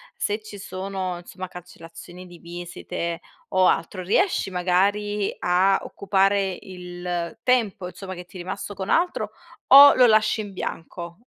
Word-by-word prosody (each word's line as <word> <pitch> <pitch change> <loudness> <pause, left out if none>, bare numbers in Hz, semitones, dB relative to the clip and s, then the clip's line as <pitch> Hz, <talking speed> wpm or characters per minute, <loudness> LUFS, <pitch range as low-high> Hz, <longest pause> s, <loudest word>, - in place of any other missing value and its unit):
se 210 +1 -1
ci 210 -1 -10
sono 190 -1 -4
insomma 185 +1 -8
cancellazioni 175 0 -12
di 175 -1 -14
visite 170 0 -6 0.3
o 185 -1 +4
altro, 185 +3 0
riesci 205 - +1
magari 200 +3 0
a 185 +2 +3
occupare 195 -1 +1
il 175 -1 -6
tempo, 225 -7 +1
insomma 185 0 -8
che 180 0 -9
ti 185 - -13
è - - -9
rimasto 195 +3 -5
con 190 0 -6
altro 350 +2 +1 0.4
o 280 +1 +10
lo 250 - +6
lasci 215 0 +3
in 205 -2 -8
bianco? 170 0 -6
185 Hz, 145 wpm, -24 LUFS, 175-205 Hz, 0.4 s, o